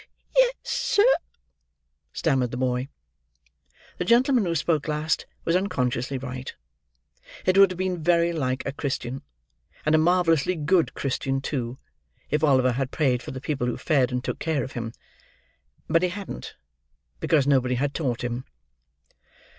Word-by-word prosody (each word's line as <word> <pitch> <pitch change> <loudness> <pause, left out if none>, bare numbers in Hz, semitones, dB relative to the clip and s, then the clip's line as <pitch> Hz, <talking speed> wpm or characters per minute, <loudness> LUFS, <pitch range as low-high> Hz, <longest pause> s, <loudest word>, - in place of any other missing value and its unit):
"Yes, - - +5
sir," 410 - +2 1.1
stammered 135 -6 +1
the 120 - -5
boy. 125 0 0 1.1
The - - +1
gentleman 240 +1 +4
who 170 -1 -1
spoke 160 -1 0
last 155 +1 -1 0.2
was 165 - +2
unconsciously 135 -9 0
right. 130 0 -6 0.9
It 185 - +3
would 195 -1 +7
have 185 - -6
been 185 -2 -2
very 170 +1 +3
like 130 -5 -2
a 140 - -1
Christian, 135 -2 -3 0.6
and 155 - +3
a 155 - +6
marvellously 175 0 +3
good 165 +2 +1
Christian 135 0 -1
too, 130 -3 -3 0.5
if 150 +2 +1
Oliver 130 -4 +4
had 130 +1 -2
prayed 130 -6 +1
for - - -8
the 130 - -5
people 130 -3 -2
who 120 - -2
fed 135 -6 +2
and 125 0 -2
took - - -3
care 155 -5 0
of 130 - -6
him. 115 -2 -4 1.0
But 165 +1 +3
he 180 - +2
hadn't, 200 +2 -7 0.6
because 150 -5 +2
nobody 130 -3 +2
had 140 +3 -1
taught 125 -7 -2
him. 120 +1 -3
145 Hz, 150 wpm, -25 LUFS, 130-170 Hz, 1.1 s, would